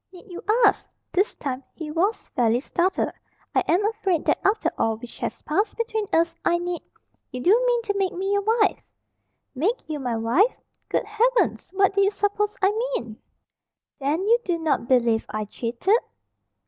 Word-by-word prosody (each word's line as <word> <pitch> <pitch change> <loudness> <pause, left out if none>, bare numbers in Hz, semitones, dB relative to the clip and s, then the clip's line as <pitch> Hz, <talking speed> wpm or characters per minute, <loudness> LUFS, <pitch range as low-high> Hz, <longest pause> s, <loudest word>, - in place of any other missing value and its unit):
"Need 370 +1 -14
you 350 - -7 0.2
ask?" 405 - +2 0.2
This 390 +4 +1
time 270 -2 -4
he 315 -2 -6
was 380 +8 0
fairly 235 -1 +2
startled. 350 +7 0 0.4
"I - - +4
am 370 +5 +3
afraid 410 -6 0
that - - +2
after 415 +3 +2
all 225 -1 0
which 235 +1 -12
has - - -4
passed 400 +8 0
between 445 -2 -2
us, 330 0 +2
I 345 - +3
need 350 -1 -3 0.3
" - - -46
"You 250 - -5
do 350 +9 +3 0.2
mean 480 -1 +2
to 420 -3 -1
make 385 -2 +1
me 385 +2 -2
your 405 - +2
wife?" 435 0 +2 0.7
"Make 365 - -1
you 305 -2 -3
my 245 -3 -2
wife? 260 - +2 0.3
Good - - 0
heavens! 460 +4 +1
What 390 0 +3
do 400 - +3
you 395 - +4
suppose 410 +1 -1
I 385 - +5 0.2
mean?" 225 -2 -5 0.8
"Then 290 +6 0
you 465 +3 +4
do 350 -2 0
not 315 -7 0
believe 235 -3 +2
I 215 0 -3
cheated?" 240 - 0
360 Hz, 180 wpm, -24 LUFS, 270-415 Hz, 0.8 s, I